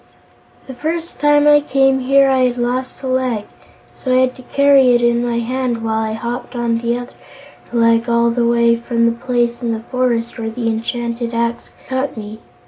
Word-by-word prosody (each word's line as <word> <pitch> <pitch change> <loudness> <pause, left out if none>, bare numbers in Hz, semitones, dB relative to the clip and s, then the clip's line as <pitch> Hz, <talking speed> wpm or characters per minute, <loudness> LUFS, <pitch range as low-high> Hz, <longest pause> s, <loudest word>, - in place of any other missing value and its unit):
"The 265 - -8
first 325 +6 -4
time 295 +1 +4
I 295 0 +6
came 270 -2 +2
here 275 +1 +4
I 260 -1 +3
had 250 0 -1
lost 250 +2 -3
a - - -3
leg, 255 -5 -1 0.5
so 255 - -4
I 255 0 +4
had 255 -1 +1
to 260 - -12
carry 270 -1 +4
it 240 - +2
in 235 0 +2
my 240 -1 -1
hand 240 -1 -2
while 220 0 -1
I 220 0 -2
hopped 240 +3 -5
on 235 -1 0
the 235 +1 -1
other 245 0 -8 0.6
leg 230 0 +2
all 235 0 +2
the 235 0 0
way 235 0 +3
from 235 0 -1
the 230 - +3
place 240 0 -1
in 235 -2 -1
the 220 - -4
forest 240 -2 -1
where 225 -1 -3
the 230 +1 -5
enchanted 235 +1 -3
axe 235 0 -2 0.2
cut 260 0 -3
me. 215 0 -8
240 Hz, 200 wpm, -17 LUFS, 235-260 Hz, 0.6 s, I